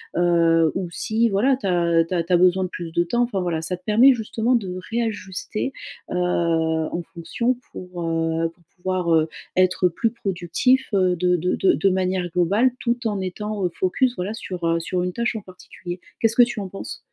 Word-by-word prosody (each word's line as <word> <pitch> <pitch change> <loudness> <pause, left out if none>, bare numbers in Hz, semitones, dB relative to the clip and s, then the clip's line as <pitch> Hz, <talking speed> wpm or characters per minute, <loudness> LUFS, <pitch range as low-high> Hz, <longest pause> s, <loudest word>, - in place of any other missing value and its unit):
Heu, 165 -2 +3
ou 185 -2 -2
si, 220 +7 +1
voilà, 240 +7 +2
tu 230 - -8
as 170 -2 +3
tu 185 - -5
as 175 - +2
tu 180 - -2
as 175 - +7
besoin 185 +1 +4
de - - -5
plus 170 -2 -6
de 170 - +2
temps, 240 +8 +1
enfin, 210 -6 -2
voilà, 170 -3 -1
ça 180 +3 -2
te 180 - -30
permet 235 +7 +6
justement 225 +1 -1
de 185 -5 -2
réajuster, 225 +2 -3 0.4
heu, - - -2
en 165 -2 0
fonction, 235 +9 -1
pour, 180 -1 -7
heu, 165 0 0
pour 170 +1 -25
pouvoir, 180 -1 -1
heu, 160 0 +3 0.3
être 185 0 +3
plus 225 +7 -1
productif, 220 +5 0
heu, 185 -2 +3
de 180 +1 +2
de 180 +1 0
de 370 -2 +3
de 195 - +2
manière 185 -1 0
globale, 190 +9 +2
tout 240 0 -1
en 205 -2 -2
étant, 205 +2 -3
heu, - - +1
focus, 240 +9 +1
voilà, 185 +4 -3
sur, 180 -6 -5
heu, 165 0 +2
sur 180 +2 -2
une 180 0 -2
tâche, 235 +2 -1
en 220 - -4
particulier. 180 -1 -9 0.2
Qu'est-ce 225 0 +2
que 245 - +8
tu 240 -2 -2
en 200 - -4
penses? 195 - -7
185 Hz, 205 wpm, -22 LUFS, 170-220 Hz, 0.4 s, que